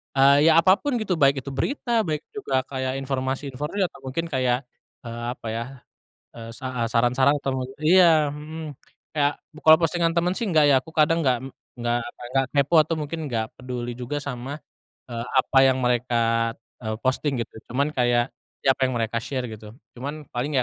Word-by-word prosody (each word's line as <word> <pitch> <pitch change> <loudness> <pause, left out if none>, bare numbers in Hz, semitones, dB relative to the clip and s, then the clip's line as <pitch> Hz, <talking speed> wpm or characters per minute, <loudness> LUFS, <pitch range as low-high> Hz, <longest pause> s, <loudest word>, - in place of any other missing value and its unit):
Eee, 140 +3 +6
ya 160 - +6
apapun 225 +9 +3
gitu 195 -7 -1
baik 135 -2 +3
itu 140 - -6
berita 235 - -1
baik 155 -1 -2
juga 135 -11 -1
kayak 130 -1 -3
informasi-informasi 135 +6 -3
atau 175 - -4
mungkin 135 +5 -3
kayak, 130 0 +1 0.4
eee, 120 0 -6
apa 115 - -9
ya, 115 +1 -2 0.7
eee, 115 0 -8
saha 125 -2 -3
saran-saran 125 +4 +3
atau 135 -1 -1
mne 130 +1 -5
iya, 160 -2 +5
mhm, 155 +2 -7 0.5
ya 145 0 +3 0.2
bu 155 - -14
kalau 160 +1 +8
postingan 165 0 +1
temen 175 +2 +1
sih 235 - -1
nggak 155 -6 +4
ya 140 - +6
aku 160 +5 -6
kadang 160 +1 +3
gak 125 -2 +3
m 135 - -7 0.3
nggak 120 0 0
apa - - -11
nggak 135 -1 +3
kepo 140 +3 +2
atau 155 +1 +4
mungkin 155 +2 -4
nggak 115 -5 -1
peduli 120 -1 -5
juga 130 +4 -4
sama, 140 +2 -6 0.4
eee, 120 -2 -6 0.2
apa 130 +1 +2
yang 130 - +2
mereka, 115 -2 +1 0.2
eee, 110 -2 -3
posting 135 +3 +1
gitu - - -34 0.2
cuman 140 +5 0
kayak, 120 -2 +1 0.3
ya 135 - +6
apa - - -15
yang 130 - -3
mereka 115 0 -1
share 130 +1 -4
gitu 110 +1 -11 0.2
cuman 145 +3 -5
paling 135 +4 -2
135 Hz, 185 wpm, -24 LUFS, 125-155 Hz, 0.7 s, kalau